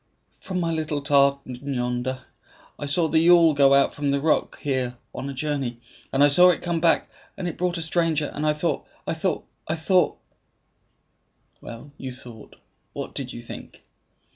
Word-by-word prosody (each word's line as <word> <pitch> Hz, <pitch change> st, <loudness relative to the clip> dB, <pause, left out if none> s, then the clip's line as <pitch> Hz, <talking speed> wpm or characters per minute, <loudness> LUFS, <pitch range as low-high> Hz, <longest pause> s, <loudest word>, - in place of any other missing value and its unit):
"From 185 Hz, -1 st, -4 dB
my 165 Hz, -1 st, 0 dB
little 155 Hz, -3 st, -2 dB
tartan 140 Hz, -3 st, +2 dB, 0.2 s
yonder, 125 Hz, +1 st, -2 dB, 0.6 s
I 145 Hz, -, -4 dB
saw 160 Hz, +3 st, +2 dB
the 160 Hz, +1 st, +3 dB
yawl 165 Hz, -1 st, +6 dB
go 140 Hz, -1 st, +5 dB
out 140 Hz, -, +3 dB
from 145 Hz, -1 st, -2 dB
the 140 Hz, 0 st, +1 dB
rock 155 Hz, +2 st, +1 dB
here 130 Hz, -3 st, -1 dB, 0.2 s
on 140 Hz, -, -5 dB
a -, -, -3 dB
journey, 135 Hz, -4 st, -2 dB, 0.3 s
and 135 Hz, +1 st, +3 dB
I -, -, +8 dB
saw 180 Hz, +6 st, +6 dB
it 175 Hz, -, +1 dB
come 170 Hz, -1 st, -1 dB
back, 165 Hz, 0 st, +3 dB, 0.3 s
and 180 Hz, -, -3 dB
it 170 Hz, -, -4 dB
brought 180 Hz, 0 st, -1 dB
a 165 Hz, -, -2 dB
stranger; 160 Hz, -2 st, 0 dB
and 150 Hz, -, -4 dB
I 155 Hz, 0 st, +3 dB
thought 150 Hz, +3 st, -2 dB, 0.2 s
I -, -, -1 dB
thought 160 Hz, 0 st, -2 dB, 0.2 s
I 160 Hz, -, 0 dB
thought 180 Hz, +3 st, +2 dB, 0.7 s
" -, -, -45 dB
"Well, 120 Hz, +5 st, -10 dB
you 130 Hz, -1 st, -5 dB
thought 120 Hz, -3 st, -12 dB, 0.4 s
what -, -, -6 dB
did -, -, -5 dB
you -, -, -8 dB
think?" -, -, -11 dB
145 Hz, 185 wpm, -24 LUFS, 135-165 Hz, 0.7 s, I